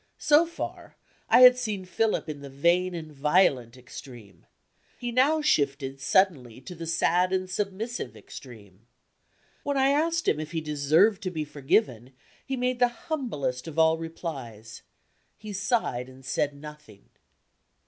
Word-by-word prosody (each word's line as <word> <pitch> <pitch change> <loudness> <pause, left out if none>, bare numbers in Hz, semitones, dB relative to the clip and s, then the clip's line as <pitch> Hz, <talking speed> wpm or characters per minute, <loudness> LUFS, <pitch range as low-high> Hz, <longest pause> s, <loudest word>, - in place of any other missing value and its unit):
So 305 +3 +4
far, 335 - -7 0.3
I - - +6
had 250 0 +9
seen 210 -6 -3
Philip 220 +2 -1
in 150 -2 -6
the 140 - -9
vain 175 +6 +1
and 160 -2 -7
violent 140 -5 +2
extreme. 120 - -13 0.5
He 240 -1 -4
now 290 +6 +3
shifted 140 - 0
suddenly 135 - +1
to 135 - -9
the 165 -1 -8
sad 175 +2 +2
and 185 0 -1
submissive 195 - -4
extreme. 110 -5 -13 0.7
When 285 -1 -2
I 270 0 +3
asked 330 +4 +1
him 150 - +2
if 155 +1 -6
he 165 - 0
deserved 155 +7 +2
to 185 - -3
be 160 -4 -4
forgiven, 135 - -1 0.3
he 265 -1 -4
made 250 0 -1
the 245 - +5
humblest 225 - -4
of 160 -1 -8
all 160 0 +4
replies 135 -10 -7 0.6
he 210 0 -8
sighed 190 - -1
and 130 0 -16
said 145 +2 -1
nothing. 150 -8 -13
160 Hz, 150 wpm, -26 LUFS, 135-220 Hz, 0.7 s, had